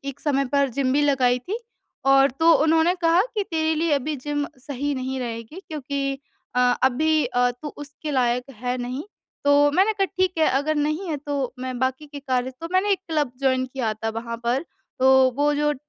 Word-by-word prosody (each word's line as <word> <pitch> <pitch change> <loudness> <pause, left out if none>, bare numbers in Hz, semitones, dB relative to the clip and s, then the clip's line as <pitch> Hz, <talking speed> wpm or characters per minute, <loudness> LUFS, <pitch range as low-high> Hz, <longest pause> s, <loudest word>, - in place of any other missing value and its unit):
एक 275 0 -6
समय 275 -2 +1
पर 280 -1 +3
जिम 255 +1 0
भी 290 +2 +3
लगाई 260 -4 +3
थी। 380 - -5 0.5
और 270 0 +6
तो 325 +6 +4
उन्होंने 325 +2 +3
कहा 335 +1 +4
कि 420 - +1
तेरे 320 -1 +1
लिए 320 0 0
अभी 290 +2 0
जिम 290 +2 -2
सही 280 +2 -3
नहीं 260 0 -3
रहेगी 230 +7 -6
क्योंकि 275 -2 -3 0.4
अ, 250 - +2 0.2
अभी 305 +3 +3
अ, 245 0 +2
तू 245 +5 -8
उसके 290 +1 -7
लायक 250 -2 +1 0.2
है 250 0 -1
नहीं। 255 +4 -4 0.4
तो 285 0 +5
मैंने 385 +7 +3
कहा 395 -2 +1
ठीक 370 -1 +3
है 315 - +4
अगर 285 +4 +1
नहीं 305 +5 -1
है 310 - -1
तो 280 -3 -3
मैं 255 -1 -4
बाकी 260 +4 -1
के 285 0 -9
कार्य 260 -2 -1
तो 330 - -5
मैंने 375 +3 +2
एक 385 - +1
क्लब 300 -5 0
जॉइन 260 -1 +2
किया 250 -4 -2
था 225 +1 -4
वहाँ 230 +1 -5
पर। 255 +6 +1 0.4
तो 260 - +5 0.3
वो 290 +1 +2
जो 295 +1 +1
अ, 295 - -1
280 Hz, 205 wpm, -23 LUFS, 255-310 Hz, 0.5 s, और